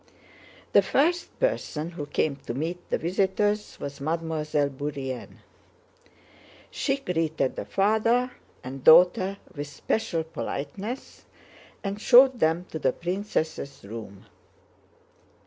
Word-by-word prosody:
The - - +8
first 340 +5 +1
person 170 - -1
who 150 -4 -6
came 145 -1 0
to 120 - -3
meet 170 +5 -4
the - - +1
visitors 195 +4 0
was 140 0 -6
Mademoiselle 155 -2 0
Bourienne. 135 -2 -5 1.3
She 275 -1 0
greeted 160 - -1
the - - -5
father 225 +5 +2 0.3
and 130 +1 -7
daughter 180 +4 +6 0.2
with 145 -2 -5
special 165 +3 -1
politeness 175 - -6 0.6
and 200 +1 -4
showed 255 +1 +7
them 165 +1 +2
to 160 - -4
the 130 -3 +2
princess' 170 -6 -3
room. 100 -2 -9
165 Hz, 110 wpm, -26 LUFS, 145-205 Hz, 1.3 s, The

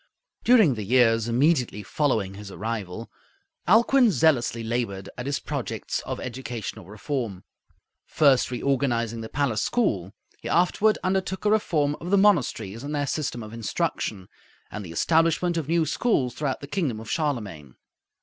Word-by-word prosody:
During 220 - +5
the 110 -3 -5
years 115 0 +3
immediately 125 -3 +1
following 110 -6 0
his 100 0 -9
arrival, 110 0 -5 0.6
Alcuin 235 +5 +5
zealously 130 - +2
labored 110 -4 -3
at 125 - -6
his 140 0 -1
projects - - -4
of - - -4
educational 120 -5 -6
reform. 105 -2 -4 0.6
First 140 -4 +3
reorganizing 120 -3 -1
the 110 - -7
palace 135 -6 0
school, 100 - 0 0.3
he 115 - -6
afterward 180 - +3
undertook 190 +1 -1
a 210 - +4
reform 155 -9 +1
of 175 - -5
the 200 - +4
monasteries 125 - +2
and 145 +2 -4
their 145 -1 0
system 135 -5 -3
of 105 +1 -10
instruction, 105 -3 -3 0.4
and 105 - -6
the 85 - -9
establishment 165 - +2
of 160 -4 -2
new 165 0 +2
schools 145 - 0
throughout 140 -1 -3
the 140 - -7
kingdom 145 - -2
of 110 - -10
Charlemagne. 105 - -3
125 Hz, 150 wpm, -25 LUFS, 110-160 Hz, 0.6 s, During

